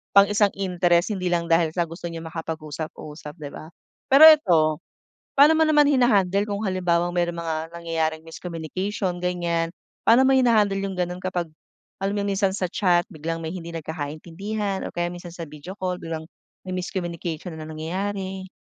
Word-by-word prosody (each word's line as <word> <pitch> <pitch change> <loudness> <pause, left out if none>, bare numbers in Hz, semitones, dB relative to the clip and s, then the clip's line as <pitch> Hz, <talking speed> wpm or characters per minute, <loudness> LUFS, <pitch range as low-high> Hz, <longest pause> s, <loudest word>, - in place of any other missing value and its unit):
pang 200 0 +8
isang 205 0 +3
interest 180 -1 +2
hindi 185 -1 -2
lang 170 -1 0
dahil 165 -1 +4
sa 175 - +2
gusto 170 +2 -7
niyang 165 0 -7
makapag-usap-usap, 155 -1 -6
'di 150 - -6
ba? 155 - -9 0.4
Pero 275 +3 +8
eto, 220 - +5 0.8
paano 290 +3 +8
mo - - +3
naman 295 -1 +5
hina-handle 205 -8 +3
kung 205 0 -3
halimbawang 175 -2 +1
may 175 -1 +2
mga 165 -2 -3
nangyayaring 165 -2 -2
miscommunication 180 +3 -4
ganiyan? 170 -2 0 0.4
Paano 240 +4 +7
mo 265 - +4
hina-handle 220 -6 +4
yung 195 - -3
gano'n 180 0 -1
kapag 180 -3 -2 0.5
alam 195 +1 0
mo - - 0
yung - - -1
minsan 195 0 +2
sa 190 -1 -1
chat 175 -2 +2
biglang 165 +2 -4
may 160 - -4
hindi 170 -2 -7
nagkakaintindihan 165 +6 -4
o - - -12
kaya 175 0 -1
minsan 175 0 -9
sa 170 -1 -6
video 150 +5 -9
call 180 -2 -2
biglang 160 -1 -5 0.4
may 185 - -4
miscommunication 175 -2 -4
na 155 -1 -7
nangyayari? 190 +4 -4
175 Hz, 165 wpm, -24 LUFS, 165-195 Hz, 0.8 s, pang